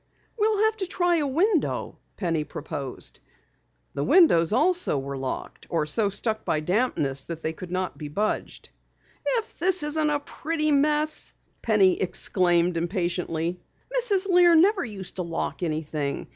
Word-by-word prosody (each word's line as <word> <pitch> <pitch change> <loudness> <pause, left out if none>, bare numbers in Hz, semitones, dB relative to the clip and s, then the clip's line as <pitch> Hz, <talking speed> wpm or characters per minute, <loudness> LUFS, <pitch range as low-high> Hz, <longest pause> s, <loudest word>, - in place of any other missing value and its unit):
"We'll 430 -2 +2
have 440 0 +2
to 380 -3 -3
try 355 -2 +1
a 295 -3 0
window," 340 +5 0 0.2
Penny 165 -5 -1
proposed. 145 -3 -6 0.7
The 140 - -2
windows 170 - +5
also 340 - +2
were 140 +1 -4
locked 130 -1 -6
or 160 -3 0
so 200 +7 +2
stuck 220 +2 -1
by 155 - 0
dampness 155 - 0
that 165 -1 -7
they 160 - -1
could 180 +2 -9
not 185 0 -3
be 150 - -5
budged. 205 +9 -3 0.5
"If 460 -3 -2
this 360 -1 +2
isn't 300 +1 +1
a 295 -1 +1
pretty 305 +1 -2
mess!" 300 +2 +1 0.3
Penny 200 -5 +3
exclaimed 175 -2 +1
impatiently. 175 -1 -2 0.4
"Mrs. 410 -6 +2
Lear 355 -2 +6
never 380 +4 +4
used 195 -7 -6
to - - -1
lock 170 +1 -4
anything. 155 -3 -3
205 Hz, 145 wpm, -25 LUFS, -, 0.7 s, Lear